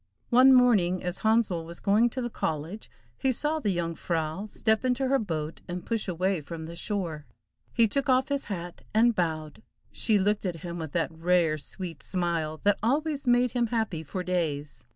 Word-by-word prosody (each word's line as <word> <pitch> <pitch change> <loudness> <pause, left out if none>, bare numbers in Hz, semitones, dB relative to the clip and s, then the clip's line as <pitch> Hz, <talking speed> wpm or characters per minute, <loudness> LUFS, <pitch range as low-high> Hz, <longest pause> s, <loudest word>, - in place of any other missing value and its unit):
One 255 +2 +7
morning 210 -9 +4
as 180 0 -3
Handsel 220 -6 +2
was 170 +1 -8
going 215 +4 +3
to 255 +2 -4
the 240 - -2
college, 160 +6 -4 0.3
he 265 - +2
saw 300 +5 0
the 215 - -1
Jung 170 -3 -1
frau 165 +4 -2
step 220 +2 +1
into 255 +1 +1
her 275 0 +3
boat 160 -6 -4
and 175 0 -5
push 225 -3 -1
away 185 0 0
from 160 +2 -7
the 165 - -8
shore. 170 - -3 0.4
He 230 -1 +4
took 275 +5 -1
off 260 +1 +3
his 280 -1 -1
hat 175 -4 -6
and 235 +2 +5
bowed. 160 -3 -2 0.3
She 220 -2 +2
looked 205 +1 +1
at 165 -3 -4
him 170 -1 -5
with 160 -3 -6
that 165 -5 0
rare, 165 -1 +2
sweet 165 -1 -7
smile 170 -4 -1
that 205 0 +3
always 280 +4 0
made 245 0 +4
him 240 -2 +1
happy 220 -8 -1
for 180 +4 -5
days. 155 -7 -2
185 Hz, 190 wpm, -28 LUFS, 165-235 Hz, 0.4 s, One